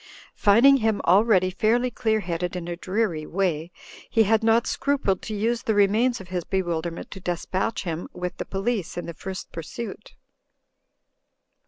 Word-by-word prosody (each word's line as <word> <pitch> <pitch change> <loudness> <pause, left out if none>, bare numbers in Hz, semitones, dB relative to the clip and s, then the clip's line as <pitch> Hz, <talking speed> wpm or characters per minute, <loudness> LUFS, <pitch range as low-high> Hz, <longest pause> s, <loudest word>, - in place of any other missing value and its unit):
Finding 240 +7 +6
him 220 -4 +1
already 185 0 +4
fairly 235 +6 +1
clear 220 -1 0
headed 175 0 -3
in 175 -1 -5
a 175 - -3
dreary 185 -4 -1
way, 170 -4 -1 0.4
he 225 - +4
had 220 +1 +3
not 225 +1 +4
scrupled 270 -10 0
to 215 - -5
use 230 +3 0
the 220 - 0
remains 220 +5 +3
of 185 - -11
his 180 -2 -2
bewilderment 170 -3 -3
to 195 - -7
despatch 185 +4 -2
him 170 -2 -4
with 180 0 -5
the - - -4
police 195 -3 -2
in 175 - -3
the 170 - -6
first 190 +3 -7
pursuit. 215 +6 -7
195 Hz, 160 wpm, -25 LUFS, 175-225 Hz, 0.4 s, Finding